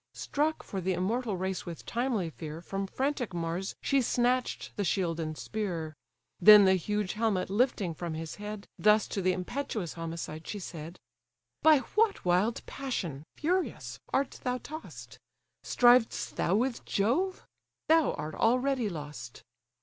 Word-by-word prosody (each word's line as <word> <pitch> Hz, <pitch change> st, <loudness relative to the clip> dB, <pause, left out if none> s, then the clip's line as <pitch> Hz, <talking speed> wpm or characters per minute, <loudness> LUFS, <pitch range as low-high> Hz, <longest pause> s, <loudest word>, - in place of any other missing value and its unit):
Struck 305 Hz, +2 st, -1 dB
for 195 Hz, -, -4 dB
the 185 Hz, +1 st, 0 dB
immortal 205 Hz, +4 st, -1 dB
race 190 Hz, 0 st, -3 dB
with 170 Hz, -2 st, -7 dB
timely 235 Hz, -8 st, -1 dB
fear, 155 Hz, 0 st, -7 dB
From 195 Hz, +3 st, -4 dB
frantic 260 Hz, -4 st, -2 dB
Mars 170 Hz, +3 st, -3 dB
she 275 Hz, -1 st, +3 dB
snatch'd 250 Hz, +1 st, 0 dB
the 205 Hz, -, -1 dB
shield 170 Hz, -2 st, 0 dB
and 155 Hz, -1 st, -3 dB
spear; 170 Hz, -8 st, -4 dB, 0.4 s
Then 210 Hz, +2 st, +10 dB
the 190 Hz, -, +6 dB
huge 205 Hz, +2 st, -1 dB
helmet 210 Hz, -4 st, 0 dB
lifting 210 Hz, -5 st, +1 dB
from 165 Hz, 0 st, -5 dB
his 160 Hz, 0 st, -6 dB
head, 210 Hz, 0 st, -7 dB
Thus 210 Hz, 0 st, +4 dB
to 195 Hz, -, -2 dB
the 185 Hz, 0 st, +3 dB
impetuous 190 Hz, -, -3 dB
homicide 165 Hz, -1 st, -6 dB
she 210 Hz, -, -4 dB
said: 170 Hz, -2 st, -7 dB, 0.6 s
"By 310 Hz, -3 st, +6 dB
what 425 Hz, -, +2 dB
wild 185 Hz, +6 st, +2 dB
passion, 175 Hz, -, -4 dB
furious! 360 Hz, +4 st, -1 dB
art 275 Hz, 0 st, 0 dB
thou 250 Hz, 0 st, 0 dB
toss'd? 310 Hz, +5 st, -9 dB, 0.4 s
Striv'st 245 Hz, -1 st, +4 dB
thou 180 Hz, -, +1 dB
with 245 Hz, +3 st, 0 dB
Jove? 320 Hz, -, 0 dB, 0.4 s
thou 320 Hz, -1 st, +4 dB
art 155 Hz, +1 st, -5 dB
already 250 Hz, 0 st, +2 dB
lost. 145 Hz, -, -8 dB
205 Hz, 145 wpm, -30 LUFS, 170-250 Hz, 0.6 s, Then